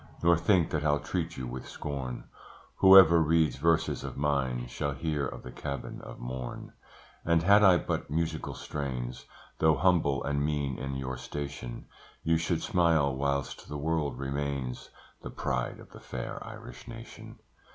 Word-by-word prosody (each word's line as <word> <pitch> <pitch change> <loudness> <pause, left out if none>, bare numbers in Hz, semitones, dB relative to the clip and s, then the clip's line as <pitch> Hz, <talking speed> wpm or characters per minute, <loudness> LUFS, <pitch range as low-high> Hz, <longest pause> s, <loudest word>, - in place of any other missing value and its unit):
Nor 85 0 +6
think 85 0 +2
that 75 -2 -1
I'll 75 -1 +3
treat 75 - -3
you 65 - -4
with 65 +1 -6
scorn; 65 -4 -5 0.5
Whoever 95 -4 +9
reads 80 -4 +3
verses 80 +3 +1
of - - -6
mine 65 -4 0
Shall 70 +3 -3
hear 75 0 -1
of - - -8
the 65 - -8
Cabin 70 -1 -6
of - - -9
Mourne; 60 0 -6 0.5
And 85 0 +2
had 100 +4 +6
I 95 -3 +7
but - - -3
musical 80 +1 -2
strains, 65 -4 -5 0.3
Though 80 -1 +5
humble 75 -3 +2
and 70 0 0
mean 70 -3 -1
in 70 0 -4
your 65 -1 -4
station 70 -2 -6 0.4
You 80 0 +3
should 80 0 -1
smile 85 -8 +3
whilst 70 0 -2
the 75 - -4
world 75 -2 -1
remains, 70 -2 -3 0.3
The - - -7
pride 65 -1 -2
of - - -14
the - - -12
fair - - -6
Irish - - -10
Nation. 115 -1 -10
75 Hz, 160 wpm, -29 LUFS, 65-80 Hz, 0.5 s, Whoever